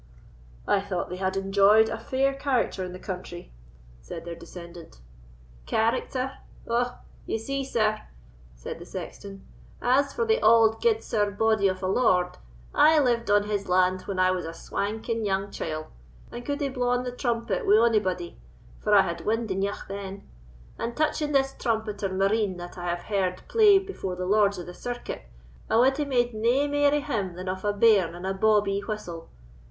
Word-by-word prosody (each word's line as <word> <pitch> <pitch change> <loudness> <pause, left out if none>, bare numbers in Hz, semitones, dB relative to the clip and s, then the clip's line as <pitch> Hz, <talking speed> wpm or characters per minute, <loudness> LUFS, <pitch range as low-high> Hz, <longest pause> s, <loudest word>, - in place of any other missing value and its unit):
"I 200 - +3
thought 190 -3 -4
they 180 - -4
had 190 0 -1
enjoyed 200 +3 +5
a 225 0 -4
fair 265 +4 0
character 270 -8 -1
in 180 - -5
the 180 - -8
country," 180 -2 -7 0.5
said 165 - -8
their 170 - -5
descendant. 170 - -11 0.7
"Character! 255 +4 -1 0.3
Ou, 235 +1 +2 0.4
ye - - -1
see, 275 +5 -3
sir," 215 -4 0 0.5
said - - -7
the - - -10
sexton, 195 -1 -8 0.3
"as 275 +3 +2
for 465 - -1
the 450 +2 +2
auld 225 -1 +5
gudesire 330 - +1
body 215 0 +2
of 185 0 -2
a - - 0
lord, 185 -4 +2 0.3
I 315 +1 +6
lived 240 -6 +2
on 205 0 +4
his 205 -2 -3
land 185 0 +3
when 195 - -3
I 185 0 +4
was 185 -1 -2
a 165 +1 -6
swanking 220 +5 -3
young 195 0 -1
chield, 155 -1 -4 0.5
and 240 - -7
could 285 +3 -3
hae 280 - 0
blawn 245 -1 0
the 250 - -4
trumpet 230 -6 -2
wi' 205 +2 +6
ony 230 -1 +4
body, 180 -3 -4 0.4
for 210 - +2
I 200 - +8
had 170 -2 -4
wind 225 0 -1
eneugh 195 +2 -2
then; 195 0 -7 0.5
and 235 0 -4
touching 300 -1 0
this 270 -1 +2
trumpeter 220 -5 -2
Marine 195 0 +1
that 175 0 -8
I 175 - -6
have 175 0 -3
heard 190 -3 -1
play 430 -3 +6
afore 385 - -4
the 180 0 -4
lords 200 0 +3
of 175 - -6
the 180 - -9
circuit, 245 - -6 0.4
I 220 - +3
wad 265 +3 +4
hae 295 - 0
made 245 -3 +1
nae 235 +6 +2
mair 290 0 +3
o' 295 0 +1
him 210 -11 -3
than 185 +1 -7
of 185 0 -3
a 205 - +2
bairn 205 -5 +4
and 175 +1 -7
a 190 - 0
bawbee 205 0 +2
whistle. 200 -6 -6
210 Hz, 180 wpm, -26 LUFS, 185-245 Hz, 0.7 s, I